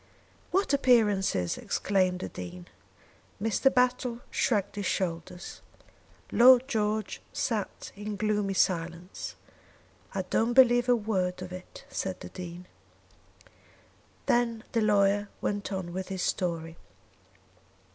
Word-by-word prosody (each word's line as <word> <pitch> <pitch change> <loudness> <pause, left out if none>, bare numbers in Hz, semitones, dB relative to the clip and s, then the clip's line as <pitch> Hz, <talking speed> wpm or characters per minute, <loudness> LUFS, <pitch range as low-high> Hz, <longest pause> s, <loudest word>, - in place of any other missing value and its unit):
"What 385 -5 +1
appearances!" 210 - +3
exclaimed 185 -2 0
the - - -4
Dean. 90 -1 -8 0.7
Mr. 225 +5 +2
Battle 250 -1 +1
shrugged 205 -5 0
his 200 -2 -2
shoulders. 175 -1 -3 0.7
Lord 255 +1 +7
George 215 -3 -1
sat 215 -5 -3
in 205 +1 -5
gloomy 205 -1 0
silence. 175 0 -1 0.8
"I 190 - 0
don't 225 +6 +1
believe 245 -1 +6
a 245 - +6
word 185 -5 -1
of 180 0 -8
it," 185 0 -10
said 190 -1 -4
the - - -8
Dean. 180 -1 -8 1.6
Then 235 -2 +1
the 230 - +1
lawyer 205 -1 +3
went 205 0 -2
on 185 -3 -4
with 185 +1 -4
his 190 -2 -3
story. 165 -2 -2
200 Hz, 115 wpm, -29 LUFS, 180-230 Hz, 1.6 s, Lord